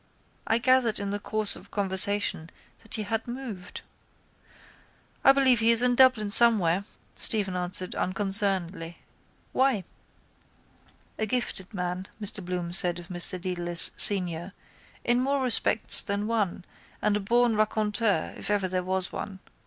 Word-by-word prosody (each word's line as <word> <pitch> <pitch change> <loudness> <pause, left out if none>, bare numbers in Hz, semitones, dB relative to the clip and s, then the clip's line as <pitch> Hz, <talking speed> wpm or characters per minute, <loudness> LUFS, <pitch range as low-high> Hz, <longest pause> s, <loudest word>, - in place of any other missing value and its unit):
I 225 - +2
gathered 245 -2 +1
in 200 0 -5
the 205 - -4
course 215 0 -2
of - - -16
conversation 195 -4 +2 0.3
that 225 - -7
he 215 - -4
had 225 +3 -5
moved. 240 -7 -9 1.4
—I 270 - +6
believe 265 -3 +2
he 225 0 +1
is 230 +1 +3
in 250 0 +2
Dublin 245 -5 +2
somewhere, 200 -5 +4 0.3
Stephen 200 -4 +1
answered 180 0 -3
unconcernedly. 190 -3 +2 0.5
Why? 260 -7 0 1.4
—A 220 - -2
gifted 215 -5 -4
man, 180 -1 -6
Mr 205 -1 -4
Bloom 175 -1 -6
said 175 -1 +5
of 175 -1 -12
Mr 180 +1 -4
Dedalus 175 -1 +2
senior, 180 -2 +3 0.5
in 240 0 0
more 275 +1 -2
respects 235 -3 +3
than 200 +1 -4
one 210 -6 -3 0.3
and 210 -1 -1
a - - -2
born 235 +3 0
raconteur 215 -3 -2
if - - -8
ever 205 -2 -1
there 185 0 -3
was 185 0 -3
one. 195 -2 -8
205 Hz, 140 wpm, -25 LUFS, 185-230 Hz, 1.4 s, I